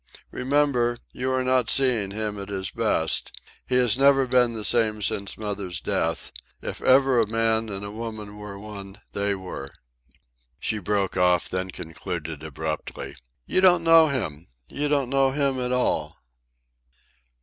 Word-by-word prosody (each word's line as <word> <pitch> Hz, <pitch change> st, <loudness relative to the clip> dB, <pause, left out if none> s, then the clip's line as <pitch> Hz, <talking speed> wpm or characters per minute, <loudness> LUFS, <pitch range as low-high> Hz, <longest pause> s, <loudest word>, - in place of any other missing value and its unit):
"Remember, 130 Hz, -3 st, +1 dB
you 130 Hz, +1 st, -2 dB
are 130 Hz, 0 st, +1 dB
not 130 Hz, -2 st, +2 dB
seeing 125 Hz, -7 st, +2 dB
him 105 Hz, 0 st, -3 dB
at 100 Hz, -, -8 dB
his 95 Hz, -1 st, -3 dB
best. 105 Hz, -8 st, 0 dB, 0.3 s
He 125 Hz, -, 0 dB
has 125 Hz, -1 st, +4 dB
never 135 Hz, -1 st, +5 dB
been 125 Hz, -2 st, +3 dB
the 110 Hz, -2 st, -4 dB
same 110 Hz, -3 st, +2 dB
since 100 Hz, +1 st, -2 dB
mother's 100 Hz, -4 st, -4 dB
death. 80 Hz, 0 st, -2 dB, 0.3 s
If -, -, -6 dB
ever 135 Hz, -1 st, +5 dB
a 110 Hz, -, +2 dB
man 115 Hz, 0 st, +1 dB
and 100 Hz, +1 st, -6 dB
woman 110 Hz, -2 st, -7 dB
were 105 Hz, -1 st, -8 dB
one, 100 Hz, -1 st, -9 dB
they 100 Hz, 0 st, -1 dB
were." 90 Hz, -8 st, -7 dB, 0.9 s
She 110 Hz, -, -1 dB
broke 100 Hz, 0 st, -1 dB
off, 90 Hz, -1 st, +3 dB
then 95 Hz, 0 st, -2 dB
concluded 80 Hz, -2 st, -6 dB
abruptly. 80 Hz, 0 st, -5 dB, 0.3 s
"You 185 Hz, -, +1 dB
don't 180 Hz, -3 st, +5 dB
know 165 Hz, -1 st, +7 dB
him. 90 Hz, -, -3 dB, 0.2 s
You 145 Hz, +1 st, -2 dB
don't 140 Hz, -3 st, +1 dB
know 135 Hz, -1 st, +3 dB
him 140 Hz, -2 st, +1 dB
at 125 Hz, 0 st, -1 dB
all." 125 Hz, 0 st, 0 dB
110 Hz, 150 wpm, -25 LUFS, 100-130 Hz, 0.9 s, know